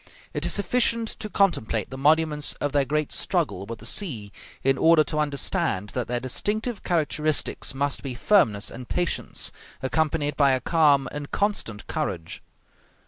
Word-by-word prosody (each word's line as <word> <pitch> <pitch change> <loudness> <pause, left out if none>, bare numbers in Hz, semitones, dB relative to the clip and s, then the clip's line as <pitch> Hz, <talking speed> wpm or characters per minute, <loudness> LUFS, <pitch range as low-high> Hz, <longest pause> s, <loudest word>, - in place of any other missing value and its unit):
It - - -1
is - - +3
sufficient 230 +2 +1
to 215 -1 -5
contemplate 125 - +1
the - - -5
monuments 150 0 +2
of 145 - -3
their 140 -1 +2
great 150 +1 -1
struggle 95 +2 -1
with 115 0 -6
the - - -12
sea 115 - -2 0.3
in 135 0 +2
order 165 -1 +6
to 150 0 -2
understand 140 -8 0
that 125 +1 -3
their 120 0 -1
distinctive 210 - -2
characteristics 155 -4 +1
must 140 0 -1
be 135 -3 -5
firmness 120 - +3
and 125 +1 -9
patience, 175 -1 -1 0.3
accompanied 150 +1 0
by 140 -2 +4
a 130 - +1
calm 145 -1 +3
and 145 -1 -6
constant 115 - -1
courage. 80 -1 -4
145 Hz, 155 wpm, -25 LUFS, 125-165 Hz, 0.3 s, order